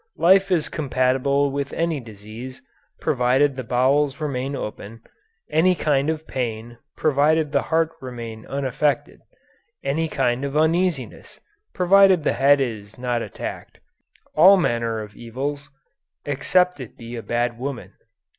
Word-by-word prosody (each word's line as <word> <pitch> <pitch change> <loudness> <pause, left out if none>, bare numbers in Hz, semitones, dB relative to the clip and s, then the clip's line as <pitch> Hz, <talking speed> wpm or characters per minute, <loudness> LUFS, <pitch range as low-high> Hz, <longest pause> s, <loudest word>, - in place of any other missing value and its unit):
"Life 190 +2 +4
is 170 -4 +2
compatible 140 0 +1
with 140 0 -3
any 165 -3 -1
disease, 115 +3 -10 0.4
provided 130 +3 +2
the 130 - -5
bowels 135 +4 +1
remain 140 -2 -3
open; 110 -1 -7 0.4
any 165 +4 +3
kind 145 -3 +1
of 160 0 -3
pain, 120 -3 -4 0.2
provided 150 +1 +2
the - - +2
heart 160 0 0
remain 115 -4 -7
unaffected; 140 0 -1 0.6
any 155 +4 0
kind 130 -2 0
of 140 +1 -2
uneasiness, 160 -2 0 0.4
provided 190 -2 +5
the - - +1
head 140 +2 +4
is 110 -5 -4
not 125 -1 -1
attacked; - - -7 0.6
all 185 +6 +7
manner 115 - 0
of 105 -1 -10
evils, 140 +5 -5 0.6
except 180 +5 +1
it 125 -4 -9
be 115 +1 -8
a 115 - -5
bad 120 +1 -2
woman." 135 -1 -6
135 Hz, 130 wpm, -22 LUFS, 120-155 Hz, 0.6 s, all